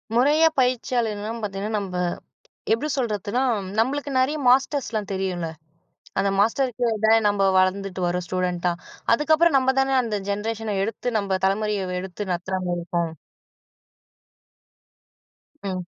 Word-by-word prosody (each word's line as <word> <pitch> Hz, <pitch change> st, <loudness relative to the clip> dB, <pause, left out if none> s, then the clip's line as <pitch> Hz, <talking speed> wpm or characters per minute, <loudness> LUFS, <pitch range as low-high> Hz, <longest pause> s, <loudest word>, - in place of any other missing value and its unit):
முறையா 295 Hz, +6 st, +5 dB
பயிற்சியாளர்லாம் 230 Hz, -3 st, 0 dB
பார்த்தீங்கன்னா, 205 Hz, +1 st, -3 dB
நம்ப 190 Hz, -2 st, -5 dB, 0.8 s
எப்படி 230 Hz, +7 st, +1 dB
சொல்றதுன்னா 220 Hz, 0 st, -1 dB, 0.4 s
நம்மளுக்கு 280 Hz, +4 st, 0 dB
நெறைய 285 Hz, +4 st, +1 dB
மாஸ்டர்ஸ்லாம் 250 Hz, -5 st, +2 dB
தெரியும்ல. 185 Hz, -3 st, -2 dB, 0.7 s
அந்த 200 Hz, -, +2 dB
மாஸ்டருக்கு 245 Hz, +3 st, +1 dB, 0.2 s
தான் 220 Hz, 0 st, +5 dB
நம்ம 195 Hz, -1 st, +2 dB
வளர்ந்துட்டு 185 Hz, 0 st, +1 dB
வரோம் 180 Hz, 0 st, -1 dB
ஸ்டூடென்ட்டா, 180 Hz, -1 st, 0 dB, 0.4 s
அதுக்கப்புறம் 315 Hz, +4 st, +3 dB
நம்ம 265 Hz, 0 st, +2 dB
தானே 270 Hz, 0 st, +2 dB
அந்த 215 Hz, -3 st, -2 dB
ஜென்ரேஷன 215 Hz, +1 st, -2 dB
எடுத்து 225 Hz, +4 st, -4 dB
நம்ம 195 Hz, -2 st, -1 dB
தலைமுறைய 205 Hz, 0 st, 0 dB, 0.2 s
எடுத்து 190 Hz, +1 st, -6 dB
நடத்துறமாரி 180 Hz, 0 st, -2 dB
இருக்கும். 170 Hz, -2 st, -2 dB, 2.5 s
ம். 185 Hz, -2 st, -3 dB
210 Hz, 110 wpm, -24 LUFS, 190-250 Hz, 2.5 s, முறையா